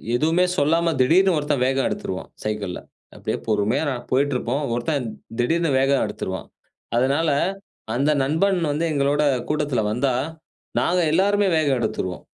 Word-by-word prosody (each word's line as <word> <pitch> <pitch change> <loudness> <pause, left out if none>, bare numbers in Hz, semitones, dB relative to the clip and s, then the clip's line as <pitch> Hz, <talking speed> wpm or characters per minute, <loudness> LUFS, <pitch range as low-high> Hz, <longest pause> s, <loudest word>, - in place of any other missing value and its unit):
எதுவுமே 165 +7 +3
சொல்லாம 165 +3 +2
திடீர்ன்னு 180 +7 +4
ஒருத்தன் 145 -3 0
வேகம் 135 +1 +1
எடுத்துருவான் 95 0 -5
சைக்கிள்ல. 105 -4 -3 0.4
அப்படியே - - -3
பொறுமையா 110 +6 +1 0.3
போயிட்டு 140 +2 +2
இருப்போம். 130 +5 -2
ஒருத்தன்திடீர்ன்னு 125 +4 -1
வேகம் 135 0 +2
எடுத்துருவான். - - -5 0.5
அதனால 140 +6 +2 0.7
அந்த 140 +4 +2
நண்பன் 175 +7 +1
வந்து 155 +3 -1
எங்களோட 145 +1 +1 0.3
கூட்டத்தில 150 -6 0
வந்தா, 125 +4 +1 0.7
நாங்க 180 +1 +2
எல்லாருமே 200 +4 +3
வேகம் 145 -4 +2
எடுத்துருவோம். 95 -5 -3
145 Hz, 120 wpm, -22 LUFS, 125-160 Hz, 0.7 s, திடீர்ன்னு